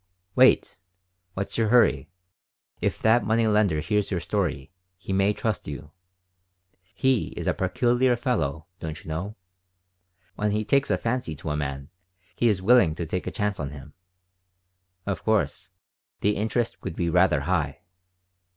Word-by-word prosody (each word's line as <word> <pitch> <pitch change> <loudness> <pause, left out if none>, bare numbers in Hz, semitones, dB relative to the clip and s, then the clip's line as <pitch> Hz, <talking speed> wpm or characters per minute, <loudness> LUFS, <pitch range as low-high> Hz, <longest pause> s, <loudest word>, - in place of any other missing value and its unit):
"Wait. - - +4 0.6
What's 100 +3 -3
your 110 - +2
hurry? 120 +1 +4 0.7
If - - -1
that 110 +2 +4
money 115 +1 +2
lender 105 -8 +2
hears 105 +4 0
your 95 - -1
story, 70 -3 -2 0.3
he 95 0 -5
may 95 +1 +3
trust 105 0 -3
you. 75 +1 -7 1.0
He 130 -4 +2
is - - -4
a - - +2
peculiar 125 +5 +2
fellow, 80 - -1
don't 80 -1 -6
you - - -10
know. 90 +7 -4 1.0
When 105 0 -1
he 105 +1 -1
takes 140 +4 +2
a - - +2
fancy 115 -9 -2
to 75 0 -5
a - - -1
man 70 -1 -4 0.4
he 120 - +2
is 95 -3 0
willing 95 -8 +5
to 85 - -4
take 90 +3 -3
a - - -2
chance 105 -2 -2
on 70 - -3
him. 75 +1 -11 1.1
Of 100 -1 -3
course, 105 -3 0 0.5
the 105 +1 +2
interest 110 +3 -1
would 80 - -5
be 85 - -1
rather 90 -4 +3
high." 75 -2 -1
100 Hz, 155 wpm, -25 LUFS, 80-110 Hz, 1.1 s, willing